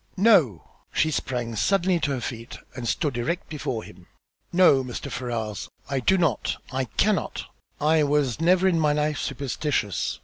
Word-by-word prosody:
"No!" 180 Hz, -, +4 dB, 0.2 s
She 155 Hz, -, +1 dB
sprang 120 Hz, -5 st, -2 dB
suddenly 185 Hz, -, +2 dB
to 155 Hz, -3 st, -1 dB
her 130 Hz, -, -3 dB
feet 115 Hz, 0 st, -6 dB, 0.2 s
and 120 Hz, -2 st, -5 dB
stood 135 Hz, 0 st, -1 dB
erect 170 Hz, +10 st, -2 dB
before 130 Hz, -7 st, -3 dB
him. -, -, -14 dB, 0.4 s
"No, 170 Hz, -7 st, +5 dB
Mr. 125 Hz, -2 st, -6 dB
Ferrars, 115 Hz, -4 st, -4 dB, 0.2 s
I 135 Hz, -, +1 dB
do 190 Hz, +9 st, +3 dB
not! 165 Hz, -, 0 dB
I 130 Hz, 0 st, -1 dB
cannot. 100 Hz, -5 st, 0 dB, 0.3 s
I 155 Hz, +1 st, +3 dB
was 145 Hz, -2 st, +1 dB
never 180 Hz, +2 st, +4 dB
in 170 Hz, -3 st, +2 dB
my 150 Hz, -2 st, +3 dB
life 150 Hz, -1 st, 0 dB
superstitious. 140 Hz, -5 st, -2 dB
140 Hz, 160 wpm, -25 LUFS, 120-165 Hz, 0.4 s, No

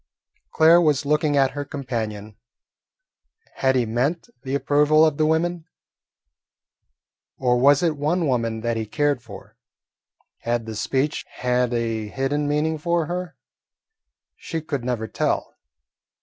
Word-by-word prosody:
Claire 165 Hz, +2 st, +6 dB
was 150 Hz, -3 st, +2 dB
looking 150 Hz, 0 st, +1 dB
at 135 Hz, -1 st, +3 dB
her 145 Hz, 0 st, -4 dB
companion. 110 Hz, -7 st, -5 dB, 1.2 s
Had 130 Hz, 0 st, +2 dB
he 125 Hz, -2 st, +2 dB
meant 125 Hz, +9 st, -1 dB
the 135 Hz, 0 st, -3 dB
approval 150 Hz, +2 st, +4 dB
of 155 Hz, -3 st, 0 dB
the 155 Hz, -, +2 dB
women, 165 Hz, +1 st, 0 dB, 1.7 s
or 125 Hz, -2 st, +2 dB
was 140 Hz, +4 st, +5 dB
it 165 Hz, -3 st, +1 dB
one 160 Hz, +4 st, 0 dB
woman 115 Hz, -5 st, -1 dB
that 115 Hz, 0 st, -1 dB
he 110 Hz, -1 st, -3 dB
cared 145 Hz, 0 st, 0 dB
for? 110 Hz, -4 st, -12 dB, 0.8 s
Had 120 Hz, -1 st, -2 dB
the 110 Hz, -1 st, -6 dB
speech 135 Hz, +7 st, -1 dB
had 125 Hz, -1 st, 0 dB
a 115 Hz, -2 st, -2 dB
hidden 135 Hz, +5 st, -1 dB
meaning 150 Hz, +2 st, 0 dB
for 170 Hz, +1 st, 0 dB
her? 175 Hz, +1 st, -5 dB, 1.0 s
She 165 Hz, -, -5 dB
could 145 Hz, -5 st, -4 dB
never 120 Hz, -3 st, -2 dB
tell. -, -, -2 dB
140 Hz, 135 wpm, -23 LUFS, 120-155 Hz, 1.7 s, Claire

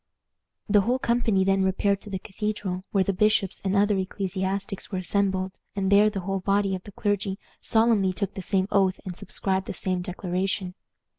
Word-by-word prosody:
The 205 Hz, 0 st, +5 dB
whole 245 Hz, +6 st, +1 dB
company 235 Hz, -6 st, +2 dB
then 195 Hz, 0 st, +2 dB
repaired 195 Hz, +1 st, +1 dB
to 210 Hz, -, -9 dB
the 195 Hz, -, -2 dB
Cathedral, 195 Hz, -2 st, -4 dB
where 195 Hz, -2 st, +3 dB
the 195 Hz, -, 0 dB
bishops 210 Hz, 0 st, +2 dB
and 195 Hz, 0 st, 0 dB
other 205 Hz, +1 st, +3 dB
ecclesiastics 190 Hz, +1 st, -3 dB
were 190 Hz, -, -2 dB
assembled, 190 Hz, 0 st, 0 dB, 0.2 s
and 195 Hz, -1 st, 0 dB
there 205 Hz, +1 st, +6 dB
the 200 Hz, -2 st, -4 dB
whole 195 Hz, +1 st, -2 dB
body 195 Hz, +1 st, +1 dB
of 185 Hz, -, -3 dB
the 205 Hz, -, -9 dB
clergy 200 Hz, -1 st, -1 dB, 0.2 s
solemnly 220 Hz, -4 st, +3 dB
took 195 Hz, +1 st, -3 dB
the 190 Hz, -, -5 dB
same 190 Hz, +1 st, +1 dB
oath 190 Hz, -2 st, +2 dB
and 180 Hz, -2 st, -5 dB
subscribed 190 Hz, +1 st, -1 dB
the -, -, -4 dB
same 185 Hz, -1 st, -1 dB
declaration. 185 Hz, 0 st, -2 dB
195 Hz, 180 wpm, -26 LUFS, 190-205 Hz, 0.2 s, there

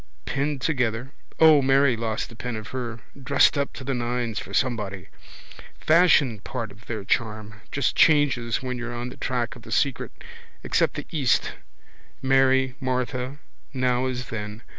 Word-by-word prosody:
Pinned 140 Hz, 0 st, -1 dB
together. 125 Hz, -2 st, -1 dB, 0.3 s
O, 155 Hz, -3 st, +7 dB
Mairy 135 Hz, -1 st, +4 dB
lost 110 Hz, -1 st, -3 dB
the 115 Hz, -, -13 dB
pin 120 Hz, +1 st, -5 dB
of 110 Hz, -2 st, -7 dB
her. 120 Hz, -2 st, -5 dB, 0.2 s
Dressed 140 Hz, +2 st, +4 dB
up 140 Hz, -1 st, -1 dB
to -, -, -8 dB
the 135 Hz, +1 st, -2 dB
nines 120 Hz, -2 st, -2 dB
for -, -, -9 dB
somebody. 105 Hz, -7 st, -1 dB, 0.7 s
Fashion 155 Hz, -, +4 dB
part 115 Hz, +1 st, -5 dB
of 105 Hz, +3 st, -17 dB
their 110 Hz, -4 st, -4 dB
charm. 105 Hz, -1 st, -2 dB
Just 140 Hz, -3 st, 0 dB
changes 135 Hz, -6 st, +3 dB
when 125 Hz, -1 st, -3 dB
you're 120 Hz, 0 st, -5 dB
on 120 Hz, +1 st, -4 dB
the -, -, -11 dB
track 125 Hz, -3 st, -2 dB
of 125 Hz, -, -13 dB
the -, -, -12 dB
secret. 140 Hz, -4 st, 0 dB, 0.5 s
Except -, -, +1 dB
the -, -, -5 dB
east: 140 Hz, -6 st, +1 dB, 0.7 s
Mary, 130 Hz, 0 st, +3 dB
Martha: 130 Hz, 0 st, -2 dB, 0.4 s
now 125 Hz, 0 st, +1 dB
as 125 Hz, -2 st, -4 dB
then. 105 Hz, 0 st, -6 dB
125 Hz, 160 wpm, -25 LUFS, 115-135 Hz, 0.7 s, O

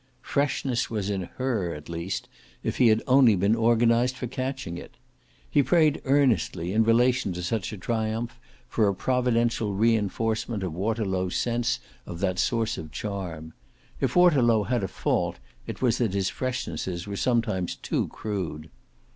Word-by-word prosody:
Freshness 135 Hz, -3 st, 0 dB
was 105 Hz, -3 st, -2 dB
in 95 Hz, -3 st, -3 dB
HER 110 Hz, -, -1 dB
at 75 Hz, -, -10 dB
least, 85 Hz, +3 st, -4 dB, 0.4 s
if -, -, -2 dB
he 125 Hz, -, +5 dB
had 110 Hz, 0 st, +3 dB
only 130 Hz, -4 st, +6 dB
been 100 Hz, +4 st, +2 dB
organised 115 Hz, +2 st, +3 dB
for 130 Hz, -, -4 dB
catching 130 Hz, -6 st, -4 dB
it. -, -, -10 dB, 0.5 s
He 145 Hz, -, +3 dB
prayed 150 Hz, +3 st, +3 dB
earnestly, 120 Hz, -, +2 dB
in 110 Hz, +1 st, +4 dB
relation 120 Hz, -2 st, +3 dB
to 90 Hz, 0 st, -5 dB
such 95 Hz, +2 st, -2 dB
a 105 Hz, -, -6 dB
triumph, 115 Hz, +3 st, -2 dB, 0.3 s
for 110 Hz, -3 st, +2 dB
a 100 Hz, -, +1 dB
providential 120 Hz, -3 st, +1 dB
re 115 Hz, +3 st, +4 dB
enforcement 110 Hz, +1 st, -1 dB
of 90 Hz, -4 st, -3 dB
Waterlow's 95 Hz, -1 st, -1 dB
sense 120 Hz, 0 st, 0 dB, 0.3 s
of 85 Hz, -, -7 dB
that 95 Hz, -1 st, 0 dB
source 115 Hz, -3 st, 0 dB
of 80 Hz, -1 st, -8 dB
charm. 85 Hz, -7 st, -5 dB, 0.5 s
If -, -, 0 dB
Waterlow 130 Hz, -12 st, +5 dB
had 120 Hz, -1 st, -1 dB
a -, -, 0 dB
fault -, -, -1 dB, 0.3 s
it -, -, -6 dB
was 120 Hz, -3 st, +2 dB
that 110 Hz, -6 st, 0 dB
his 95 Hz, -1 st, +1 dB
freshnesses 110 Hz, -8 st, -3 dB
were 100 Hz, -1 st, -5 dB
sometimes 110 Hz, -6 st, 0 dB
too -, -, -2 dB
crude. 85 Hz, -7 st, -5 dB
110 Hz, 160 wpm, -26 LUFS, 95-120 Hz, 0.5 s, only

